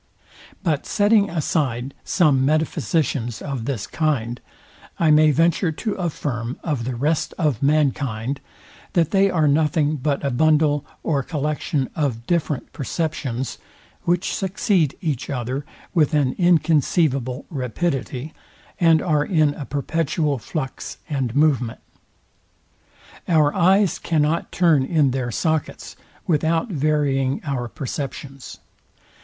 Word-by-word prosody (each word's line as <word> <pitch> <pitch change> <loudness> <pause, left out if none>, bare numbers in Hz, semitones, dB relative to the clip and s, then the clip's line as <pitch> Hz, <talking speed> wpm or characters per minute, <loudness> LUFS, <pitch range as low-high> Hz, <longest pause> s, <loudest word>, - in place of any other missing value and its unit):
But 155 -6 0
setting 205 0 +3
aside 140 -6 -1
some 145 -8 +3
metaphysicians 145 -4 0
of 135 -6 -4
this 120 -7 -2
kind, 125 -7 -1 0.6
I 160 -2 +3
may 155 0 +6
venture 165 +3 +2
to 215 +6 -3
affirm 135 -8 -3
of 145 -8 -2
the 130 0 -3
rest 150 +6 0
of 150 - 0
mankind, 140 -4 0 0.5
that 165 -4 +2
they 195 0 +4
are 160 -5 +2
nothing 150 +1 +2
but 140 +1 -1
a 140 - +1
bundle 150 +2 +3 0.2
or 145 -4 +1
collection 150 -1 -2
of 125 -7 -1
different 160 -4 -1
perceptions, 135 -4 -3 0.4
which 175 +1 0
succeed 190 -5 0
each 150 -8 -2
other 130 +2 -3 0.3
with 155 -4 +3
an 140 -4 +2
inconceivable 155 -6 +2
rapidity, 135 +1 -3 0.5
and 165 -2 +4
are 150 -4 +2
in 155 -4 +2
a 145 - -7
perpetual 145 0 -1
flux 130 +2 -5
and 135 -5 -2
movement. 135 -6 +2 1.5
Our 155 -4 +3
eyes 190 +1 +3
cannot 160 0 0
turn 165 -6 +3
in 145 -2 +2
their 125 -1 -2
sockets 155 - -2 0.3
without 165 +5 +1
varying 140 -4 +1
our 135 -5 -2
perceptions. 135 0 -6
150 Hz, 115 wpm, -22 LUFS, 135-160 Hz, 1.5 s, may